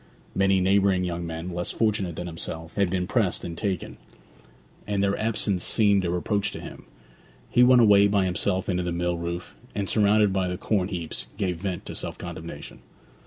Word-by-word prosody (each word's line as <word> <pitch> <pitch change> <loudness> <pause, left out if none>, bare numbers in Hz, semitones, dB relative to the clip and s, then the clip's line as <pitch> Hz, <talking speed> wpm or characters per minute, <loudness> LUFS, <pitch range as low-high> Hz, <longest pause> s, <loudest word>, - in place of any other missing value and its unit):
Many 95 0 +3
neighbouring 95 0 +3
young 85 -1 -3
men, 80 +2 -5
less 85 0 -3
fortunate 105 -6 0
than 90 - -5
himself, 80 -1 -6
had 100 -3 +1
been 90 0 0
pressed 100 -2 0
and 85 - -5
taken; 95 -1 -3 0.9
and 100 -1 0
their 100 0 +2
absence 105 -4 0
seemed 100 -3 +3
a 85 - 0
reproach 100 +4 0
to - - -6
him. - - -10 0.7
He 120 - +4
went 125 0 +7
away 100 -2 +6
by 100 -2 +2
himself 95 +1 -1
into 90 -2 0
the 90 -1 -2
mill 85 0 -1
roof, 85 +1 -5 0.2
and, 100 -1 -1
surrounded 105 -1 +3
by 95 -1 +1
the 90 0 -3
corn 95 -3 0
heaps, 85 -5 -4
gave 95 -4 -1
vent 90 0 -4
to - - -6
self - - -6
condemnation. 85 -3 -8
95 Hz, 185 wpm, -26 LUFS, 85-100 Hz, 0.9 s, went